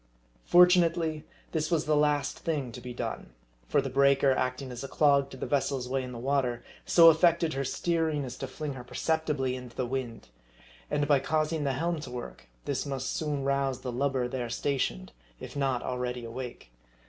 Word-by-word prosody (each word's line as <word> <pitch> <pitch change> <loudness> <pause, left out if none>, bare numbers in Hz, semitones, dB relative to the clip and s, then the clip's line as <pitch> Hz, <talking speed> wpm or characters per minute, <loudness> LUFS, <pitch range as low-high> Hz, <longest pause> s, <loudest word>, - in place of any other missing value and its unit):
Fortunately, 170 -3 +4 0.3
this 155 -1 -1
was 165 -3 +1
the 155 0 +2
last 150 -1 +1
thing 145 -7 -2
to - - -9
be 125 - -7
done; 120 - -5 0.3
for 140 - +2
the 135 - -3
breaker, 140 0 +4
acting 130 0 -1
as 125 +1 -6
a - - -4
clog 140 -1 +3
to 130 - -10
the - - -4
vessel's 135 -2 0
way 135 +1 -1
in 125 -1 -6
the 120 - -7
water, 125 -1 0 0.2
so 165 -1 +8
affected 165 0 +3
her 135 +1 -1
steering 160 0 0
as 125 -1 -6
to 135 - -4
fling 145 +2 -5
her 125 -2 -8
perceptibly 150 -2 -1
into 125 -2 -9
the 130 - -1
wind. 120 - -5 0.6
And 145 0 0
by 145 -2 +5
causing 155 +2 0
the 135 - +1
helm 165 +4 -1
to 145 -4 -7
work, 120 - -8 0.2
this 135 -2 -1
must 135 -2 -3
soon 150 -3 -2
rouse 135 -1 0
the 125 - -4
lubber 130 0 0
there 125 -2 -4
stationed, 115 - -2 0.3
if - - -9
not 135 -3 0
already 125 -1 -3
awake. 120 - -7
135 Hz, 190 wpm, -29 LUFS, 125-150 Hz, 0.6 s, so